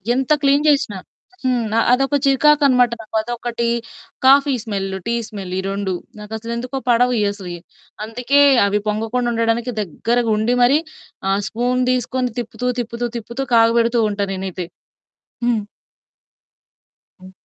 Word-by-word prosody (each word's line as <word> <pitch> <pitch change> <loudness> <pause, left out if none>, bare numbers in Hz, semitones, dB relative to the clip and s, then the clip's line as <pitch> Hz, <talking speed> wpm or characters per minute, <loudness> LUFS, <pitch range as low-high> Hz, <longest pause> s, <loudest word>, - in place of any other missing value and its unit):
ఎంత 265 +3 -1
క్లీన్ 285 +1 +3
జేసినా, 275 -9 +2 0.5
హ్మ్. 250 -3 +1 0.3
అదొక 270 +3 +2
చికాకనమాట 275 -3 +4
నాకు 220 0 -10
అదొకటి, 235 +1 -3 0.6
కాఫీ 275 +1 +6
స్మెల్లు, 195 -4 -3
టీ 235 - +1
స్మెలు 195 -4 -7
ఈ - - -1
2 195 -1 -2 0.3
నాకసలు 220 +2 -6
ఎందుకో 250 +3 -4
పడవు 245 +1 +4
ఇయ్యి 205 -1 +2
అసలియి. 180 -4 -8 0.4
అందుకే 250 +5 +1 0.2
అవి 205 +1 +1
పొంగకుండా 225 +3 -1
ఉండడానికి 230 +1 0
దగ్గరగా 230 +5 -1
ఉండి 225 +3 +1
మరి 270 +5 +5 0.5
ఆ - - +3
స్పూన్ 245 +3 0
దీసుకొని 250 0 -1
తిప్పుతూ, 245 +2 -4
తిప్పుతూ, 235 +1 -4
తిప్పుతూ 235 +4 -5
కాగబెడుతూ 230 +1 +4
ఉంటాను 200 -1 -2
నేనైతే. 185 -2 -5 0.8
హ్మ్. 230 -4 +1 1.6
హ్మ్. 185 0 -12
235 Hz, 125 wpm, -19 LUFS, 210-250 Hz, 1.6 s, కాఫీ